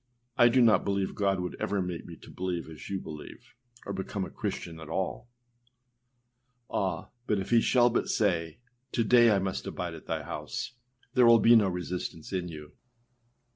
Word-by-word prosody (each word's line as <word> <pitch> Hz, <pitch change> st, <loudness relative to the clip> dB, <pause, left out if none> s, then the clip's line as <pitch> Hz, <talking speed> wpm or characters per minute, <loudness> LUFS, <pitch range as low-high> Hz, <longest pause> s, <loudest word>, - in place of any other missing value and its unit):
com 120 Hz, -, +7 dB
âI -, -, +3 dB
do 130 Hz, +1 st, +4 dB
not 115 Hz, -2 st, +5 dB
believe 100 Hz, -1 st, -1 dB
God 100 Hz, -2 st, +1 dB
would 90 Hz, 0 st, -4 dB
ever 100 Hz, -, 0 dB
make 90 Hz, -2 st, -4 dB
me -, -, -9 dB
to -, -, -12 dB
believe 90 Hz, -3 st, -3 dB
as 80 Hz, -2 st, -10 dB
you 95 Hz, -1 st, -2 dB
believe, 75 Hz, -3 st, -10 dB, 0.3 s
or 100 Hz, -, -4 dB
become 95 Hz, 0 st, -3 dB
a -, -, -10 dB
Christian 80 Hz, -1 st, -5 dB
at 80 Hz, -1 st, -10 dB
all.â 95 Hz, +7 st, -3 dB, 1.5 s
Ah! 95 Hz, -2 st, -1 dB, 0.2 s
but 105 Hz, -, +2 dB
if 95 Hz, +2 st, -4 dB
he 115 Hz, -1 st, +6 dB
shall 120 Hz, 0 st, +4 dB
but -, -, 0 dB
say, 85 Hz, -7 st, 0 dB, 0.4 s
âTo 115 Hz, -3 st, +1 dB
day 120 Hz, 0 st, +7 dB
I 105 Hz, -, +4 dB
must 95 Hz, 0 st, -2 dB
abide -, -, -4 dB
at -, -, -11 dB
thy -, -, -2 dB
house,â -, -, -5 dB, 0.4 s
there 125 Hz, -2 st, +6 dB
will 115 Hz, 0 st, +8 dB
be 115 Hz, +2 st, +6 dB
no 105 Hz, -3 st, +5 dB
resistance 90 Hz, -1 st, -5 dB
in 90 Hz, -2 st, -1 dB
you. 75 Hz, -3 st, -9 dB
95 Hz, 190 wpm, -29 LUFS, 90-110 Hz, 1.5 s, will